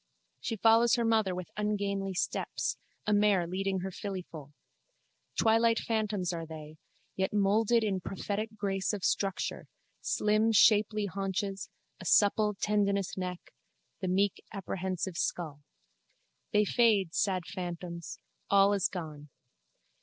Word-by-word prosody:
She 225 - -3
follows 225 +3 +5
her 235 -1 0
mother 220 -5 +2
with 180 -2 -6
ungainly 200 -2 -1
steps, - - -2 0.3
a 210 - +2
mare 205 -3 +3
leading 190 +2 -2
her 190 +1 -4
fillyfoal. 175 -7 -7 0.9
Twilight 225 +1 +4
phantoms 210 -6 -1
are 165 -1 -5
they, 155 -1 -9 0.4
yet 190 +1 -1
moulded 215 +3 +3
in 195 -3 -1
prophetic 210 +4 -4
grace 195 -1 -1
of 200 -3 -4
structure, 195 -2 -1 0.3
slim 215 +2 +2
shapely 210 0 +4
haunches, 195 0 -3 0.3
a 185 - -10
supple 210 +3 +3
tendonous 200 -2 0
neck, 180 -1 -6 0.5
the 190 - -3
meek 195 +2 +1
apprehensive 190 -2 -3
skull. 155 -6 -2 0.9
They 210 0 +3
fade, 205 -6 +3
sad 185 -3 +1
phantoms: 175 -2 -6 0.3
all 200 0 +5
is 200 -3 +2
gone. 155 -5 -7
195 Hz, 125 wpm, -30 LUFS, 180-210 Hz, 0.9 s, follows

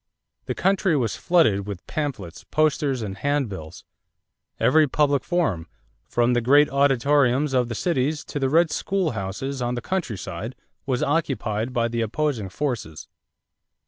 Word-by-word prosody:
The - - -2
country 190 -4 +2
was 115 -5 -1
flooded 110 - +2
with 100 -3 -7
pamphlets, 125 - -4
posters, 145 -5 +1
and 95 -2 -6
handbills. 105 - -3 0.7
Every 155 +3 +4
public 140 0 +1
forum, 130 - -1 0.4
from 120 +1 +2
the 120 - +2
great 145 +5 +5
auditoriums 140 0 +3
of 125 -2 +2
the 120 - -3
cities 150 0 -1
to 145 - -4
the 135 -1 +1
"red 160 +2 +3
schoolhouses" 135 - -2
on 120 0 -1
the - - -2
countryside, 115 - -4 0.3
was 130 -2 0
occupied 130 -7 -1
by 120 -2 +1
the 115 0 -2
opposing 115 -2 -1
forces. 105 - -4
130 Hz, 140 wpm, -24 LUFS, 110-150 Hz, 0.7 s, great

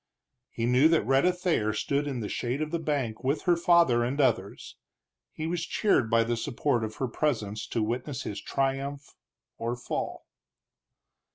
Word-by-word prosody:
He 115 - -3
knew 125 +5 +5
that 165 -1 +2
Rhetta 135 +7 +4
Thayer 175 - 0
stood 140 +7 -1
in 130 -4 -3
the 105 - -3
shade 125 +6 -2
of 155 0 -3
the 170 - -1
bank 140 -8 -2
with 140 +3 0
her 175 -2 +4
father 170 -8 +4
and 130 +5 -2
others; 115 -8 0 0.6
he 155 - -5
was 170 +1 -2
cheered 145 - +1
by 115 0 +4
the 120 +1 -1
support 120 +1 -1
of 110 0 -4
her 130 - -2
presence 110 -6 -2
to 115 - -1
witness 120 +4 -3
his 100 -1 -5
triumph 140 +1 -2 0.5
or 115 +1 -2
fall. 120 - -4
130 Hz, 170 wpm, -28 LUFS, 115-150 Hz, 0.6 s, knew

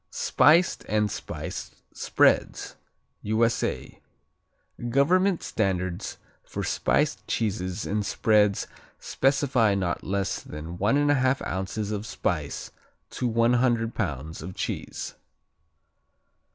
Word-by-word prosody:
Spiced 165 +4 +3
and 105 -1 +1
Spiced - - -6 0.2
Spreads - - +2 0.5
U.S.A. 110 +2 0 0.9
Government 175 +8 +3
standards 95 -4 -2 0.3
for - - -5
spiced - - 0
cheeses 95 -3 -2
and 105 +1 -1
spreads 105 -1 +2 0.3
specify 135 -6 +2
not 90 -3 -1
less 100 0 -1
than 80 +4 -8
1 140 +9 +3
1/2 130 -2 +2
ounces 95 +3 -3
of 105 0 -3
spice - - -3 0.4
to 125 - -2
100 115 0 +2
pounds 80 - -3
of 90 +3 -7
cheese. - - -4
110 Hz, 95 wpm, -26 LUFS, 95-125 Hz, 0.9 s, Spiced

